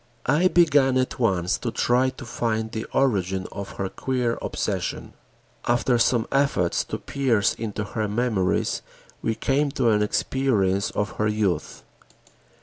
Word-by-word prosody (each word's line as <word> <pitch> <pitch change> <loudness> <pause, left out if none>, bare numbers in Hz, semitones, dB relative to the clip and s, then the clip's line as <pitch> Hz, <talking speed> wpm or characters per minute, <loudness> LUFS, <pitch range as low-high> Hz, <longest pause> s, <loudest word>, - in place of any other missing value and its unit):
I 150 +7 +4
began 145 -7 +4
at 130 0 -1
once 95 -7 +1
to - - -2
try 125 +2 +2
to 130 - -10
find 110 -2 -2
the 110 -1 -4
origin 95 -8 0
of 100 -1 -7
her 100 - -3
queer 125 +2 -2
obsession. - - -3 0.5
After 120 0 +2
some 115 -1 +3
efforts 135 -11 +1
to - - -4
pierce 125 -7 +1
into 110 -1 -4
her 105 +1 -3
memories, 105 -4 0 0.4
we 110 - -1
came 140 +4 +1
to 125 -5 +2
an 105 -1 +2
experience 105 -4 +1
of 105 -1 -3
her 105 - +1
youth. 105 -6 -1
115 Hz, 145 wpm, -24 LUFS, 105-130 Hz, 0.5 s, I